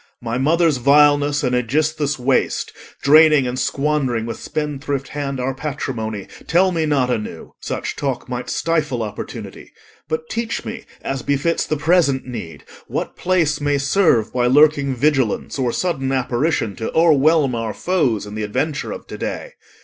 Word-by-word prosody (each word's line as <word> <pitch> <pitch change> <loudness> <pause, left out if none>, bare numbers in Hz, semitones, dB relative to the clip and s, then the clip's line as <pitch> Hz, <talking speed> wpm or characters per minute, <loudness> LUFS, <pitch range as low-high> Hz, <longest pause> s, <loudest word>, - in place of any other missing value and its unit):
My 120 +1 -3
mother's 160 +1 +3
vileness 145 +2 +4
and 125 -2 +1
Aegisthus' 150 +4 0
waste, 130 +1 0 0.3
Draining 150 -1 +6
and 125 +1 -3
squandering 135 -5 0
with 115 - -5
spendthrift 145 -2 -3
hand 140 -2 -4
Our 130 +1 -1
patrimony, 125 -7 -4 0.2
tell 185 +3 +3
me 165 -3 0
not 135 -4 +1
anew. 105 -8 -5
Such - - -4
talk 135 -3 -3
might 125 0 -5
stifle 150 -8 0
opportunity. 105 - -8 0.4
But 160 0 -3
teach 230 0 -3
me, 230 0 -6 0.2
as 135 -1 -3
befits 145 +5 0
the 155 - -1
present 145 -3 +2
need, 110 -10 -7 0.2
What - - -4
place 170 -5 +1
may 145 0 +1
serve 140 - +2
by 125 -1 +2
lurking 140 0 +4
vigilance 135 -2 0
Or 125 -2 +1
sudden 135 -4 -1
apparition 130 - 0
to 110 - -3
o'erwhelm 155 -3 +4
Our 115 -2 -2
foes 140 - 0
in 105 - -9
the 110 - -4
adventure 140 +8 -2
of - - -7
to - - -9
day. - - -4
140 Hz, 155 wpm, -20 LUFS, 125-155 Hz, 0.4 s, Draining